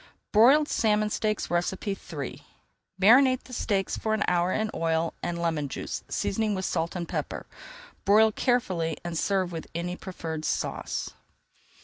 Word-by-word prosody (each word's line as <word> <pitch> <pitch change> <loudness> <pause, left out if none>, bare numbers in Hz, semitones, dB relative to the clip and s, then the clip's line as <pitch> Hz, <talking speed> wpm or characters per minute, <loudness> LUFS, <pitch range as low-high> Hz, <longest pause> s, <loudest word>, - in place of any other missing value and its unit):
BROILED 270 +8 +6
SALMON 210 -4 +1
STEAKS 215 -1 -1
III 175 -4 -3 0.6
Marinate 255 +6 +6
the 255 - -13
steaks 200 -5 -1
for 220 0 0
an 220 - 0
hour 175 0 +2
in 215 +2 0
oil 165 0 0
and 170 -1 -3
lemon 160 -4 -1
juice, - - -5
seasoning 215 0 0
with 190 0 -2
salt 165 +1 -1
and 175 -2 -3
pepper. - - -4 0.6
Broil 215 +2 +5
carefully 185 - 0
and 170 -1 -3
serve 185 +3 0
with 165 -2 -6
any 175 +1 -2
preferred 165 -4 -6
sauce. - - -2
190 Hz, 140 wpm, -27 LUFS, 170-215 Hz, 0.6 s, BROILED